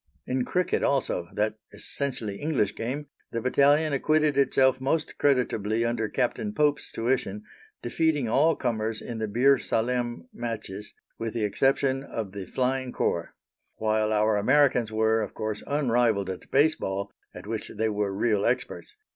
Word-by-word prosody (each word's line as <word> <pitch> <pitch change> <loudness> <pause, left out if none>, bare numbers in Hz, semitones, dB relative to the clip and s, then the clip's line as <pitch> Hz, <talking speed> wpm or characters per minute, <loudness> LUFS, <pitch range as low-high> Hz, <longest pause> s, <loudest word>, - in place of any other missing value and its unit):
In 125 -1 -1
cricket 180 -1 0
also 130 -10 0
that 105 +1 0
essentially 110 -1 -4
English 135 -9 0
game 130 +8 -4 0.3
the 115 - -2
battalion 145 +5 +3
acquitted 155 +1 +2
itself 130 -1 +3
most 155 +4 -1
creditably 115 -5 +1
under 115 -2 -1
Captain 135 - -1
Pope's 150 -1 +1
tuition, 115 -4 -1 0.4
defeating 150 +1 +1
all 150 +8 +3
comers 110 -4 -2
in 115 0 -6
the 110 - -1
Bir 130 +6 +4
Salem 120 +1 -1
matches, 110 -3 -6 0.2
with 115 0 -4
the 115 - 0
exception 135 +5 +1
of 110 -7 -5
the 100 -2 -7
Flying 130 +2 -1
Corps; 85 -7 -1 0.4
while 110 0 +1
our 110 0 +3
Americans 125 0 +3
were, 110 0 +2
of 105 - -5
course, 110 -1 -3
unrivalled 120 -8 +1
at 90 - -9
base 150 +3 +4
ball, 100 +1 -4 0.2
at - - -9
which 110 0 -4
they 110 +1 -1
were 105 -1 -1
real 105 +1 +1
experts. 125 - -2
120 Hz, 150 wpm, -27 LUFS, 110-135 Hz, 0.4 s, Bir